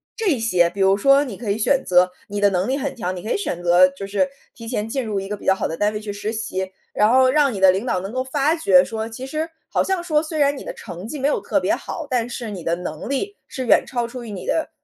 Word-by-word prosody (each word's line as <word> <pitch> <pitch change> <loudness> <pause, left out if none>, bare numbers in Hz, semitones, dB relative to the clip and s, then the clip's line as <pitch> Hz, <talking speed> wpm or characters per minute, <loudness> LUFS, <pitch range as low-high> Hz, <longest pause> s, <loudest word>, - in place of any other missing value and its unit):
这 395 - +1
些。 180 -7 +3
比 195 +3 -5
如 195 0 +5
说， 275 +6 +5
你 250 -8 -6
可 225 -3 -5
以 200 - 0
选 265 +4 +2
择 180 0 +4 0.2
你 205 0 -3
的 205 - +5
能 185 +1 0
力 265 +2 0
很 285 - -3
强， 185 -6 -3
你 180 - -6
可 220 - -4
以 - - +2
选 175 - -4
择 175 +1 +6
就 185 +2 -8
是 205 +8 +1 0.2
提 230 -2 -10
前 220 -3 -2
进 255 +2 -2
入 210 -3 -2
一 195 - -6
个 210 - -2
比 - - -13
较 190 - +5
好 - - -2
的 160 - -4
单 210 +1 +1
位 210 - -3
去 210 -1 -5
实 205 +2 -3
习， 190 -4 -3 0.2
然 210 - +3
后 260 +1 +5
让 285 -1 +3
你 200 - -4
的 190 -1 +7
领 190 +5 -2
导 185 -8 0
能 195 +2 -6
够 255 0 -1
发 285 +4 +1
觉 190 - +5
说， 220 +3 -4
其 250 +3 -7
实， 310 +4 -3 0.2
好 - - +1
像 380 -2 -1
说 310 -4 +2
虽 315 0 -5
然 285 0 +3
你 - - -8
的 - - -6
成 185 - -8
绩 295 - -5
没 270 - +1
有 290 - +1
特 - - +1
别 - - +1
好， 325 - -6
但 245 -3 0
是 235 -2 -5
你 185 -4 -7
的 170 - 0
能 170 0 -6
力 395 +10 -2
是 260 - -5
远 - - +5
超 240 -2 -2
出 245 +1 -8
于 230 - -8
你 190 -3 -7
的， 320 - 0
225 Hz, 320 characters per minute, -21 LUFS, 195-275 Hz, 0.2 s, 的